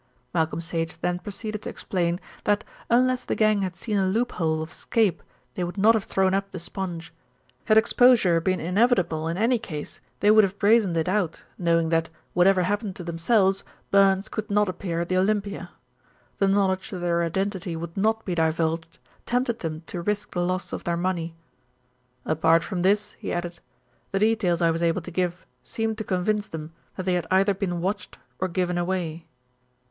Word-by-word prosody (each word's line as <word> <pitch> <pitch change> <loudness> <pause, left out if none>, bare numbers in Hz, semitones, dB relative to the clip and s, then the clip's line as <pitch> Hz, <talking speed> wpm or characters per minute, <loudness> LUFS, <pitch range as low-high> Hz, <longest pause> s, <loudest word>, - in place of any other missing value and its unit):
Malcolm 160 -2 0
Sage 165 -1 -3
then 180 0 0
proceeded 215 +2 -6
to - - -5
explain 175 -2 -1 0.3
that 205 0 +2 0.3
unless 255 +1 +3
the - - -2
gang 215 -2 +3
had 185 -2 -2
seen 210 +2 -2
a 190 - +2
loop 230 +6 0
hole 160 -2 0
of 160 - -9
escape 215 -7 0 0.3
they 180 - -3
would 175 +3 -5
not 215 +3 +6
have 220 -3 0
thrown 190 0 +1
up 195 0 0
the 185 - -7
sponge. 175 -1 -5 0.5
Had 215 -1 +4
exposure 220 -6 +5
been 185 +1 0
inevitable 180 -3 +1
in 165 +2 -2
any 230 +3 +2
case, 155 -10 -7 0.2
they 205 - +5
would 215 0 +7
have 195 0 -1
brazened 205 -5 +3
it 160 - 0
out, 185 -3 -1
knowing 165 -2 +1
that, 165 0 +1 0.2
whatever 185 +1 +4
happened 205 +1 -1
to 180 - -7
themselves, 190 +4 +2 0.3
Burns 195 0 +4
could 215 -1 -5
not 210 0 +3
appear 175 -2 -3
at 170 - -2
the 185 - +1
Olympia. 200 +1 0 0.7
The 195 - +3
knowledge 195 -1 +1
that 190 - -5
their 175 -1 0
identity 190 +1 -2
would 165 0 -6
not 220 +3 +1
be 185 - -2
divulged 165 0 0 0.3
tempted 245 -1 0
them 160 -1 -4
to 175 - -5
risk 210 +3 -2
the 175 - -1
loss 185 +1 -2
of - - -4
their 170 0 -1
money. 170 -2 -2 0.9
"Apart 160 +1 +3
from 185 -4 -3
this," 210 +3 +2
he - - -4
added, 175 0 -3 0.5
"the 195 - 0
details 195 -5 +2
I 165 - +4
was 165 +1 -2
able 170 +1 +1
to 180 - -8
give 180 0 -2 0.2
seemed 225 0 -3
to - - -2
convince 205 +2 0
them 160 0 -7 0.2
that 185 - -4
they 185 - +1
had 175 -2 -1
either 195 +2 +4
been 180 -3 -2
watched 195 +4 -3 0.2
or 185 - 0
given 180 0 -1
away." 170 -2 -3
185 Hz, 190 wpm, -25 LUFS, 170-205 Hz, 0.9 s, would